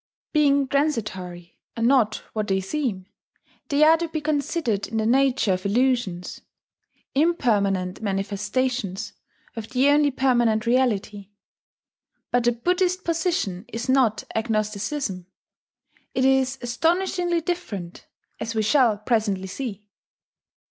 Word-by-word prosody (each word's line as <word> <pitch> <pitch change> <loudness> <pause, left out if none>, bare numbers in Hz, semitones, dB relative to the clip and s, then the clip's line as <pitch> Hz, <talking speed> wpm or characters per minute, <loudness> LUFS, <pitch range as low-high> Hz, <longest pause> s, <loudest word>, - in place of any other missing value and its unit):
Being 285 -3 +3
transitory, 210 - -2 0.2
and 230 - -1
not 235 -4 +3
what 215 -1 -2
they 190 -1 +1
seem, 195 -2 -3 0.6
they 285 +1 +3
are 320 +1 +7
to 335 +1 -2
be 320 -1 -3
considered 295 -7 -1
in 225 - -4
the 220 - 0
nature 255 -3 +3
of 185 0 -3
illusions, 220 -5 0 0.7
impermanent 205 - +1
manifestations 205 +2 -2 0.4
of 225 -1 -6
the 265 +2 +3
only 290 0 +4
permanent 240 -5 +2
Reality. 210 -5 0 1.0
But 245 -1 +2
the 240 - +5
Buddhist 360 +9 0
position 325 - -1
is 230 +2 -5
not 260 -5 +2
agnosticism: 215 -2 -2 0.9
it 260 - +2
is 265 0 +2
astonishingly 345 +7 0
different, 210 - -5 0.3
as 225 0 -4
we 220 - +1
shall 235 -2 +3
presently 210 -3 0
see. 210 0 -6
240 Hz, 115 wpm, -24 LUFS, 205-280 Hz, 1.0 s, are